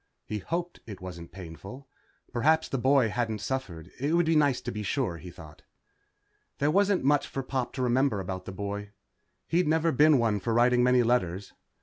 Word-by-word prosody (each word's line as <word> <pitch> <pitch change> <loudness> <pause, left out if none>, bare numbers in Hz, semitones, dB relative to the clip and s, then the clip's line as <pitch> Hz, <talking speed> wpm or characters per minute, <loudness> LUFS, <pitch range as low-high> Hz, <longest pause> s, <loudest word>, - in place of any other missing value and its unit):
He 105 - -4
hoped 175 - -4
it 105 -3 -8
wasn't 85 -2 -9
painful. 95 +9 -10 0.5
Perhaps 160 +6 +2
the 135 - -2
boy 130 -2 +3
hadn't 110 -1 -1
suffered. 100 -8 -5
It 145 +5 +1
would 170 0 +3
be 160 0 +2
nice 145 -4 +3
to - - -4
be 105 - -5
sure, 105 -3 -1
he 90 - -10
thought. 80 -3 -13 1.0
There 145 +2 +1
wasn't 200 0 +2
much 145 +1 +2
for 135 - -4
Pop 130 -1 -2
to 130 - -2
remember 125 -2 +2
about 95 0 -5
the - - -6
boy. 100 +1 -5 0.5
He'd 170 0 +1
never 160 +1 +2
been 150 +2 +5
one 110 -4 +1
for 115 +3 -1
writing 125 +1 +4
many 125 0 +4
letters. 100 -6 0
125 Hz, 190 wpm, -28 LUFS, 100-145 Hz, 1.0 s, been